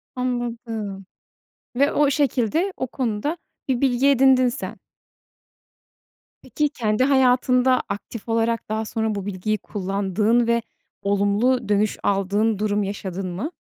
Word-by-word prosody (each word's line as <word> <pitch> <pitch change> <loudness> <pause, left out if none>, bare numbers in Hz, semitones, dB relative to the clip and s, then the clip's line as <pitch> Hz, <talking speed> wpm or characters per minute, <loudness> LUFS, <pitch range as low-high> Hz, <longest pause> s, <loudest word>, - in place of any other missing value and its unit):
Anladım 230 -5 -3 0.7
ve 280 +3 +3
o - - 0
o 275 - +3
şekilde, 285 - +1
o 260 - -2
konuda 250 +6 -2 0.3
bir 250 -2 +1
bilgi 265 0 +3
edindin 260 -2 +5
sen. 245 - -5 1.7
Peki, 300 -1 -1
kendi 220 -1 0
hayatında 255 -1 +3
aktif 230 +2 -6
olarak 230 0 0
daha 220 +1 -1
sonra 220 0 -2
bu 200 - -4
bilgiyi 205 +2 -2
kullandığın 205 +4 0
ve 235 0 +2 0.4
olumlu 205 +4 +1
dönüş 210 0 +1
aldığın 200 +2 +1
durum 210 -1 0
yaşadın 195 -1 -4
mı? 205 - -4
225 Hz, 125 wpm, -23 LUFS, 205-255 Hz, 1.7 s, edindin